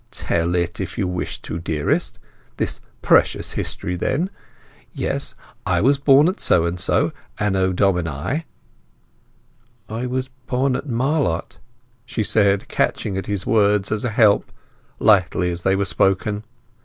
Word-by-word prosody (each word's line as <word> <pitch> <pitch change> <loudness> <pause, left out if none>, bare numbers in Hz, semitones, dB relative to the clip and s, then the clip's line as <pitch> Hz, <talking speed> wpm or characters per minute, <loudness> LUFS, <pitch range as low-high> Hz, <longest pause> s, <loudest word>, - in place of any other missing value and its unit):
"Tell 85 +1 0
it 85 -1 -1
if 95 - -5
you 100 -5 0
wish 90 0 -4
to, 80 - -5
dearest. 80 -3 -1 0.4
This - - -2 0.2
precious - - +3
history 90 - -3
then. 155 - -1 0.6
Yes, - - -2 0.3
I - - +1
was 140 +2 +3
born 140 +2 +6
at 185 - -1
so 85 -1 +3
and 85 +1 -2
so, - - +1 0.3
Anno 95 -2 +1
Domini—" 90 - 0 1.4
"I 115 +4 -4
was 130 +1 -2 0.2
born 130 +1 +1
at 140 - -5
Marlott," 130 - -1 0.4
she 115 -2 -2
said, 100 -2 +2
catching 100 - -1
at 95 - -4
his 100 -2 -2
words 105 -4 +2
as 110 -1 -1
a 120 - 0
help, 110 -2 +3 0.5
lightly 90 -3 +3
as 85 0 -4
they 95 +2 +2
were 100 +1 0
spoken. 100 +3 +1
100 Hz, 145 wpm, -21 LUFS, 90-125 Hz, 1.4 s, born